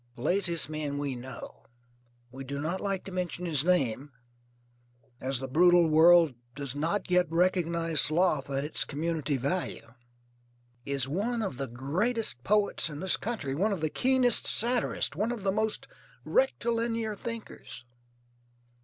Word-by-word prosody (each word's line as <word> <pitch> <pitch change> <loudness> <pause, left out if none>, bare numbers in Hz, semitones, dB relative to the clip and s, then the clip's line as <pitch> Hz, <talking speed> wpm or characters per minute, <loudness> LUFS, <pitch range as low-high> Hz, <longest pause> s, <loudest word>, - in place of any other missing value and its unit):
The 120 - -9
laziest 170 -1 +2
man 150 -2 -4
we 145 -2 -2
know 130 +2 -10 0.6
we 135 +1 -8
do 140 +1 -5
not 170 +6 -3
like 195 -2 -2
to 195 - -9
mention 180 -1 -3
his 150 -5 +2
name, 145 -6 0 1.1
as 135 0 -2
the 135 +1 -5
brutal 175 +4 +5
world 165 -1 +6 0.2
does 140 -2 -4
not 170 +7 -2
yet 180 0 +4
recognize 170 -2 +2
sloth 155 -3 +1
at 135 0 -1
its 150 - -1
community 155 -1 -2
value 140 -4 -3 0.9
is 140 -2 0
one 220 - -1
of 165 -11 -4
the 135 - -3
greatest 145 - -2
poets 205 -1 +2
in 150 -1 -7
this 190 +2 +2
country; 205 - -4
one 195 +10 +1
of 190 -5 -3
the 155 -1 0
keenest 255 -2 +3
satirists; 240 +1 +1
one 220 +4 -1
of 235 -5 -5
the 195 - +1
most 215 +2 -1 0.4
rectilinear 230 - 0
thinkers. 220 - -8
170 Hz, 145 wpm, -29 LUFS, 140-200 Hz, 1.1 s, world